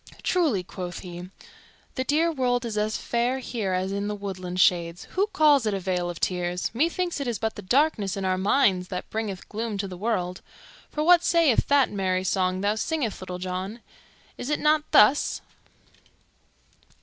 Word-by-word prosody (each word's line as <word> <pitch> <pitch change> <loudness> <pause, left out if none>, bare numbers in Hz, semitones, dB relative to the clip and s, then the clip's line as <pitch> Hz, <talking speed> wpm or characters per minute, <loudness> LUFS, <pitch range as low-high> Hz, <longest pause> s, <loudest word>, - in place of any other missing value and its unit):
"Truly," 305 - +1
quoth 180 0 -7
he, 175 0 -8 0.6
"the 260 - -2
dear 315 +5 +2
world 250 -4 0
is 225 -2 -4
as 215 +1 0
fair 240 +2 0
here 225 -7 -3
as 185 +1 -1
in 200 +1 -2
the 210 - -2
woodland 185 -3 -5
shades. 175 -1 +2
Who 395 +2 +1
calls 295 - +4
it 210 - 0
a - - -2
vale 180 -1 -1
of 175 - -6
tears? 180 0 -1
Methinks 340 +6 0
it 280 - -3
is 235 -3 -1
but 220 -1 -2
the - - -8
darkness 215 -2 +1
in 195 - -3
our 185 0 +1
minds 190 -3 +2
that 180 -1 -5
bringeth 215 -4 -4
gloom 220 -1 -4
to 195 0 -2
the 185 - -8
world. 185 -3 -2 0.5
For 300 - -2
what 350 +1 +6
sayeth 330 -10 +3
that 280 -2 +4
merry 185 -2 0
song 185 0 0
thou 205 +1 +2
singest, 235 - -2
Little 185 -1 -5
John? 185 +5 -5 0.6
Is 250 - -4
it 300 - 0
not 305 0 +2
thus? 260 +8 +4
210 Hz, 180 wpm, -25 LUFS, 185-265 Hz, 0.6 s, what